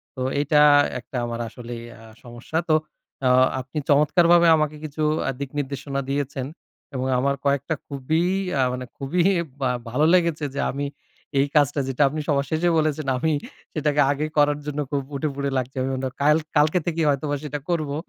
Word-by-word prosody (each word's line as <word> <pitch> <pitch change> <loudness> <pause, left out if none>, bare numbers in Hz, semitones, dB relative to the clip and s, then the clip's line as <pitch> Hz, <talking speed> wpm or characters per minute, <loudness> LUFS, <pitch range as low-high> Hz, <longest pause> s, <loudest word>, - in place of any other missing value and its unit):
তো 130 - -6 0.2
এইটা 150 +1 +3 0.4
একটা 125 +1 -7
আমার 120 0 -4
আসলেই 120 -1 -8 0.2
আ - - -15 0.2
সমস্যা। 120 +6 -6
তো 155 - +5 0.5
অ - - +4 0.3
আপনি 130 +5 -9
চমৎকারভাবে 170 +4 +5
আমাকে 155 0 -1
কিছু 155 +1 -4 0.3
আ - - +1
দিকনির্দেশনা 140 0 -3
দিয়েছেন। 140 -2 -2 0.5
এবং 130 +1 -1
আমার 140 +1 +1
কয়েকটা 140 +2 +1
খুবই 155 +4 -1 0.3
আ - - +4
মানে 125 0 -5
খুবই 160 +6 0 0.4
বা 130 - +2 0.2
ভালো 145 +6 +2
লেগেছে 170 -4 +2
যে - - -2
আমি 140 +2 -3 0.5
এই 140 - +3
কাজটা 145 -1 +3
যেটা 135 +2 -2
আপনি 155 +2 -4
সবার 140 -2 +1
শেষে 165 +2 +2
বলেছেন, 155 -2 0
আমি 160 +4 +1 0.4
সেটাকে 150 -1 +1
আগে 145 +2 -1
করার 145 0 +3
জন্য 150 0 -3
খুব 140 -1 0
উঠেপড়ে 140 -1 -2
লাগছি। 130 +1 -3 0.5
কাল 150 +2 +5 0.2
কালকে 155 +4 +4
থেকেই 165 -1 0
হয়তোবা 145 +1 0
সেটা 145 0 -4
করবো। 155 -4 -1
145 Hz, 165 wpm, -23 LUFS, 135-155 Hz, 0.5 s, তো